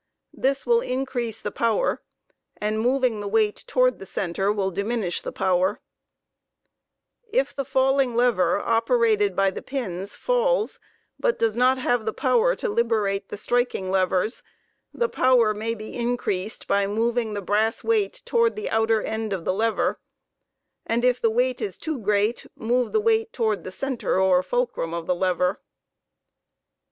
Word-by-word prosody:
This 270 +1 -1
will 470 -1 +4
increase 250 - -3
the - - -3
power, 230 - 0 0.6
and, 215 +1 -1
moving 250 -1 +1
the 205 - -4
weight 210 0 +1
toward 255 -1 +2
the 195 - -9
center 195 +3 -1
will 195 -2 -1
diminish 200 -1 -2
the - - -5
power. 185 +2 +1 0.8
* - - -60 0.7
If - - +1
the 275 - -3
falling 265 -1 +2
lever 230 -8 +2
operated 225 -4 +2
by 195 0 +3
the - - -7
pins 200 -8 -5
falls, - - 0 0.4
but 485 - +1
does 225 -2 +1
not 255 +2 +3
have 245 -3 0
the 220 - 0
power 245 -9 +2
to - - -3
liberate 210 -3 0
the - - -6
striking 240 -4 -1
levers, 190 +3 +1 0.5
the 475 - 0
power 250 - +3
may 225 +2 -3
be 215 0 -9
increased 235 -5 -2
by 200 0 +2
moving 225 +1 0
the - - -2
brass 215 +4 0
weight 450 +2 0
toward 465 -1 +2
the 430 - -4
outer 220 0 +2
end 220 -1 -3
of 185 -4 -3
the - - +1
lever, 220 +3 0 0.8
and 235 +2 0
if 250 0 +2
the 230 - +3
weight 250 +2 0
is 195 - -4
too 315 -4 -4
great, 210 +2 0
move 245 +2 0
the 435 - +2
weight 445 0 +1
toward 220 -4 -1
the 185 - -7
center 255 -3 -1
or 185 -1 +4
fulcrum 185 -4 -2
of 170 -1 -4
the 180 - +1
lever* 180 +1 0
225 Hz, 160 wpm, -24 LUFS, 200-255 Hz, 0.8 s, will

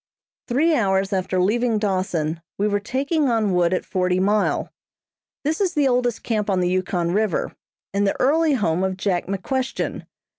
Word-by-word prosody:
Three 305 +7 +2
hours 195 -5 +1
after 185 -1 0
leaving 225 +4 +2
Dawson 185 -6 -1 0.2
we 205 - +1
were 205 -1 +1
taking 275 +7 0
on 220 -4 +1
wood 175 -1 +2
at 185 - -1
Forty 180 -1 0
Mile. 205 +2 +1 0.7
This 310 +6 -1
is 375 -4 0
the 290 -2 +3
oldest 245 -2 0
camp 215 -3 -1
on 190 -2 +2
the 180 -1 +1
Yukon 180 -2 0
River, 210 -2 0 0.4
and 200 0 +1
the - - -1
early 310 +3 +3
home 185 -6 0
of 190 -1 -1
Jack 185 -3 -1
McQuestion. 250 +7 -3
205 Hz, 165 wpm, -22 LUFS, 185-245 Hz, 0.7 s, the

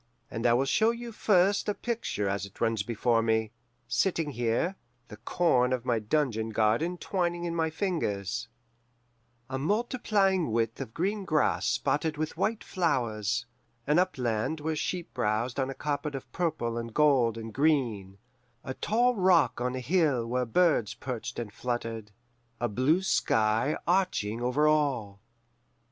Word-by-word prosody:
And 115 +1 0
I 120 - +5
will 130 +3 +2
show 220 +11 +3
you 235 0 -4
first 200 -1 +2
a 205 - 0
picture 225 - -2
as 100 0 -2
it 100 - -20
runs 115 -2 +1
before 115 +2 +1
me, 110 -1 +1 0.4
sitting 155 +5 0
here, 120 +9 0 0.3
the 105 - -10
corn 125 +1 +2
of 125 -1 -1
my 120 -3 +1
dungeon 110 -1 0
garden 115 +11 +1
twining 175 -1 -1
in 170 - -2
my 160 -1 +1
fingers: 120 - -2 1.0
"A 130 0 -3
multiplying 200 - +1
width 115 0 -1
of 110 - -7
green 200 +4 -1
grass 155 -5 +1
spotted 150 +1 0
with 155 0 -3
white 220 0 -1
flowers, 120 - -1 0.4
an 150 +4 +3
upland 130 -5 0
where 155 +1 -2
sheep 175 +3 -3
browsed 120 +2 -1
on 135 0 0
a 135 - -5
carpet 145 0 -3
of 130 -3 -8
purple 150 -10 -1
and 115 -1 -7
gold 130 -7 +3
and 115 -1 -7
green, 120 -10 +1 0.5
a 130 +1 -4
tall 240 - +2
rock 185 - +3
on 125 +1 -1
a - - -3
hill 145 -4 +1
where 125 +2 -1
birds 120 - +2
perched 125 -3 -5
and 115 -4 -5
fluttered, 115 -3 -4 0.5
a 120 - 0
blue 130 - +2
sky 110 - +2
arching 170 - 0
over 125 +5 +2
all. 130 -10 0
130 Hz, 155 wpm, -28 LUFS, 115-170 Hz, 1.0 s, I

